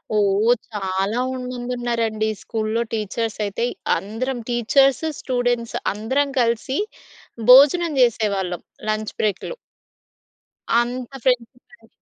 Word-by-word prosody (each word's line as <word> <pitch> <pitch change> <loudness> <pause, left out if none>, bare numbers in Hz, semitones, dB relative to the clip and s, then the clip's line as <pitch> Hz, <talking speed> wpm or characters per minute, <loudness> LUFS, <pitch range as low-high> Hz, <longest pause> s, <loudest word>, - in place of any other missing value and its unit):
ఓహ్! 210 +3 +3 0.2
చాలా 195 +2 -1 0.2
ఉంది 250 0 -5
మందున్నారండి. 235 -3 -1
స్కూల్‌లో 220 +1 -2
టీచర్సయితే 215 0 -2 0.3
అందరం 225 +8 -4
టీచర్స్, 255 +4 +3 0.2
స్టూడెంట్స్ 245 -2 -1 0.2
అందరం 260 +8 0
కలిసి 235 +3 0 0.7
భోజనం 295 +6 +7
జేసేవాళ్ళం. 200 -7 +1 0.3
లంచ్ 215 0 -2
బ్రేక్‌లో. 210 - -1 1.3
అంత 245 +1 -4
ఫ్రెండ్షిప్ 250 -1 -1
అండి. - - -21
230 Hz, 90 wpm, -22 LUFS, 215-250 Hz, 1.3 s, భోజనం